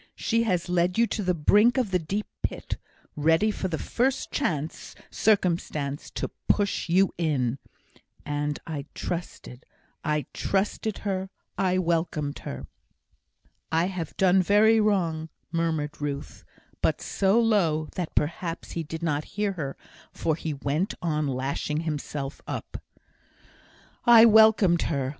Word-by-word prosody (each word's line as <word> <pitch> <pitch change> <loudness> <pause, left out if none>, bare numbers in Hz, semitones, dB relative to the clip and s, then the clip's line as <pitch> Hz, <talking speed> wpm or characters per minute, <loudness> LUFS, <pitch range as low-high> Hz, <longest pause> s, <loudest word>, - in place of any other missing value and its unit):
She 230 0 +1
has 180 -5 0
led 180 +1 +1
you 235 - +5
to 220 - -3
the 180 -2 +1
brink 210 - +4
of 245 -7 +1
the 180 - +2
deep 195 +6 -3 0.2
pit, - - -3 0.4
ready 165 +8 +3
for 195 - -3
the 165 -3 -2
first 260 - -1
chance 155 - -2 0.2
circumstance 170 -8 0
to - - -3 0.2
push 200 -4 +1
you 190 +3 +3
in. 135 -6 0 0.7
And 145 0 -2
I 150 -4 -5
trusted 170 -7 -5
her - - -36 0.3
I 150 -3 0
trusted 205 +2 -1
her 190 -1 -1 0.3
I 185 -1 +1
welcomed 165 -4 -1
her." - - -6 1.1
"I 165 +2 +3
have 170 -4 -5
done 190 0 +5
very 215 +4 +5
wrong," 170 -7 +1 0.2
murmured 160 -3 -1
Ruth, 145 0 -5 0.4
but - - +1
so 195 +3 +2
low, 175 -9 +2
that 175 -3 -4
perhaps 165 +2 -2
he 170 - -3
did 160 +1 -6
not 150 -2 0
hear 205 -1 +1
her, 145 -7 -5 0.3
for 160 - -1
he 160 0 -3
went 145 +7 -1
on, 155 -3 0
lashing 140 +3 -2
himself 145 -3 -4
up. - - -5 1.2
"I 235 -1 +9
welcomed 220 -6 +6
her. 140 -5 -1
170 Hz, 140 wpm, -26 LUFS, 150-200 Hz, 1.2 s, I